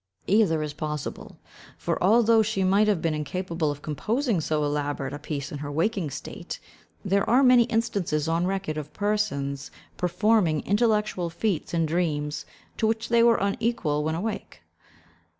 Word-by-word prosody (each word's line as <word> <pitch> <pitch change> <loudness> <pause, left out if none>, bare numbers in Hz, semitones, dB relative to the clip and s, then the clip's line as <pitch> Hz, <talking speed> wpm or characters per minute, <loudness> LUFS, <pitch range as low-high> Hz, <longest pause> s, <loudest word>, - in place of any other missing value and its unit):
Either 185 -7 +3
is 150 -1 -4
possible, 150 -1 -5 0.4
for, - - -2
although 225 +3 +5
she 210 -3 0
might 200 +3 +4
have 200 -6 +1
been 165 -2 +1
incapable 165 +2 -2
of 145 0 -5
composing 220 - -1
so 155 -1 0
elaborate 145 -2 -2
a 145 - -5
piece 145 -2 -5
in 145 - -5
her 145 0 -5
waking 170 +2 0
state, - - -7 0.5
there 195 +1 +1
are 255 +4 +5
many 250 -2 +6
instances 200 -10 -1
on 165 +2 +1
record 190 -5 -2
of 150 - -8
persons 150 -10 -1 0.3
performing 180 -2 +2
intellectual 210 -4 +1
feats 175 +1 -2
in 165 -1 +1
dreams, 150 -3 -1 0.3
to 220 - +2
which 225 +1 -1
they 235 0 +4
were 235 0 +5
unequal 200 -7 0
when 160 +1 -1
awake. 195 - -5
180 Hz, 155 wpm, -26 LUFS, 150-215 Hz, 0.5 s, many